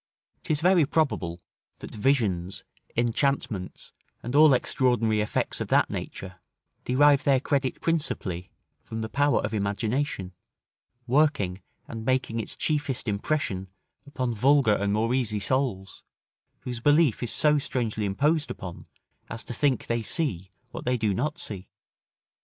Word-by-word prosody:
'Tis 155 -5 -1
very 180 -1 +5
probable, 135 - 0 0.4
that - - -9
visions, 105 -7 0 0.3
enchantments, 120 -5 -1 0.3
and 120 +3 -4
all 155 0 +8
extraordinary 120 -4 +1
effects 105 - -2
of - - -2
that - - +3
nature, 95 -1 -6 0.5
derive 145 +2 +4
their 135 -2 +4
credit 135 -1 -1
principally 95 - -1 0.3
from 110 0 -6
the 110 - -3
power 145 +5 +2
of - - -4
imagination, 105 0 -2 0.7
working 125 -9 +1 0.3
and 115 -1 -6
making 125 -2 0
its 110 - -4
chiefest 145 -5 -1
impression 100 -3 -1 0.4
upon 130 -4 -2
vulgar 130 0 +4
and 100 0 0
more 110 +3 +1
easy 115 -5 0
souls, 105 -4 -2 0.6
whose 125 -2 -5
belief 145 0 +3
is 120 - -2
so 150 -1 +3
strangely 115 -6 -2
imposed 145 +10 +1
upon, 90 -2 -8 0.4
as 115 0 -6
to - - -6
think 135 -1 +1
they 115 0 -1
see 110 - -2 0.2
what - - -7
they 125 0 +1
do 110 -3 0
not 150 - -2
see. 95 - -7
120 Hz, 135 wpm, -26 LUFS, 105-145 Hz, 0.7 s, all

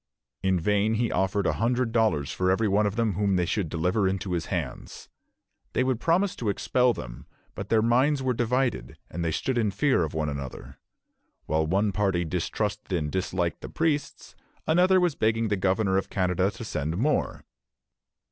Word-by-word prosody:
" - - -63
In 95 -1 +1
vain 105 +5 +1
he 115 +1 0
offered 95 +2 0
a - - +2
hundred 120 0 +1
dollars 105 -12 +1
for 90 0 0
every 105 +4 +2
one 105 +1 +2
of 100 - -3
them 115 -3 +1
whom 100 +1 +1
they 90 -1 +1
should 95 -1 -1
deliver 90 +5 +1
into 95 0 -2
his 85 -2 -2
hands. - - -5 0.6
They - - +2
would 130 -3 0
promise 180 +6 +1
to 115 - -2
expel 125 +5 +2
them; - - -8 0.3
but - - -7
their 110 -1 +3
minds 130 +4 +2
were 130 -1 +1
divided, 125 +2 -1
and 85 +1 -3
they 85 - 0
stood 120 +10 -1
in 110 -3 +1
fear 115 +1 +2
of 80 -1 -4
one 80 -1 -1
another. 70 -3 -7 0.7
While 80 +1 0
one 100 +5 +1
party 95 -3 0
distrusted 100 +5 -3
and 75 -2 -3
disliked 90 -2 -2
the - - -7
priests, 155 -3 -2 0.3
another 180 +3 +4
was 175 -3 +2
begging 110 -2 0
the 105 - +2
governor 95 0 +1
of - - -7
Canada 90 0 +1
to 105 +3 -8
send 80 -2 -3
more. 145 +8 0
100 Hz, 185 wpm, -26 LUFS, 90-120 Hz, 0.7 s, another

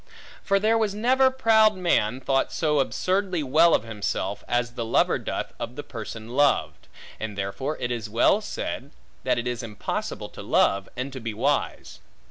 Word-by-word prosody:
For 195 -1 +2
there 220 +2 +3
was 210 -3 0
never 260 +4 +4
proud 220 -4 +4
man 130 -10 +1
thought 135 0 +1
so 150 -2 +1
absurdly 185 +4 0
well 160 +5 +5
of - - -1
himself, 110 -3 -3
as 120 0 0
the 120 -1 -4
lover 115 - +2
doth - - -4
of 120 - -5
the 145 - -6
person 110 -2 -8
loved; 145 -1 +1 0.3
and 110 -2 -5
therefore 115 +10 -3
it 120 0 -3
was 115 -3 -3
well 120 - +3
said, - - -5 0.3
That - - +1
it 120 - -2
is 125 0 -2
impossible 110 -3 -4
to - - -10
love, 100 0 +2
and 130 +2 -4
to 130 - -6
be 115 -3 -5
wise. 140 +6 -1
135 Hz, 175 wpm, -25 LUFS, 115-190 Hz, 0.3 s, well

